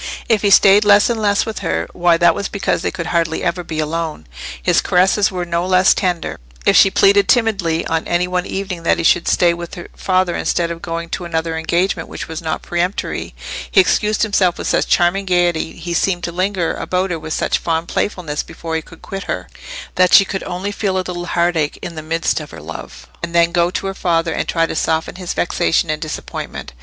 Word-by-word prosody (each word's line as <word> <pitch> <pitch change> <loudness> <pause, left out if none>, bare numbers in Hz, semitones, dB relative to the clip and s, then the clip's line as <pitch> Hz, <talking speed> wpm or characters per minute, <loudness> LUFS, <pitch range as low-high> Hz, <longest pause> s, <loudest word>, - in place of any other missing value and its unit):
If 220 -3 +2
he 205 - +2
stayed 200 +1 +6
less 205 +2 +5
and 225 -2 -2
less 205 -1 +2
with 220 - -5
her, 80 +1 -2
why, 175 -1 +3
that 170 0 +5
was 200 +2 -3
because 200 - -1
they - - -1
could 170 -3 -5
hardly 165 -2 0
ever 180 0 -1
be 160 -2 -6
alone. 155 - -3 0.3
His - - +2
caresses 190 +3 +3
were 180 -2 -3
no 170 0 -1
less 185 +1 +4
tender: 175 - -2 0.3
if - - +4
she 195 - +7
pleaded 200 +1 +4
timidly 195 -9 +1
on 165 0 -1
any 175 +1 +1
one 180 0 -2
evening 190 -3 -4
that 165 - +2
he - - -2
should 170 +1 +3
stay 175 -1 +3
with 170 0 -7
her 175 - -9
father 185 -2 +1
instead 170 -1 0
of 165 0 -7
going 165 0 -4
to 180 - -4
another 165 -1 -2
engagement 170 +1 -1
which - - -6
was 160 0 -6
not 160 -1 -3
peremptory, 175 +3 -3 0.3
he 200 - +4
excused 210 +3 +2
himself 195 -5 +2
with - - -5
such - - +1
charming 180 +3 +2
gaiety, 175 -3 +1
he 170 +1 -6
seemed 175 0 0
to 170 - -3
linger 185 -1 -1
about 185 +1 -2
her 165 - -2
with 155 0 -5
such - - 0
fond 165 0 -1
playfulness 165 -7 -2
before 165 -1 -6
he 160 - 0
could 165 +1 -16
quit 195 0 -6
her, - - -4 0.5
that 185 -1 +4
she 200 - +8
could 195 0 -4
only 185 +3 -4
feel 195 -2 -1
a 185 - -1
little 175 -1 -5
heartache 170 -4 0
in 170 - -5
the 155 - -6
midst 165 +2 -1
of 155 - -9
her 80 - -10
love, 80 +2 -9 0.2
and 170 0 -5
then 170 0 +4
go 170 0 +2
to 185 - -4
her 195 - -2
father 165 -3 0
and - - -2
try 165 -1 +1
to - - -4
soften 160 +2 -1
his 180 -2 -5
vexation 165 -1 +1
and 155 - -3
disappointment. 155 - -6
175 Hz, 220 wpm, -18 LUFS, 165-190 Hz, 0.5 s, she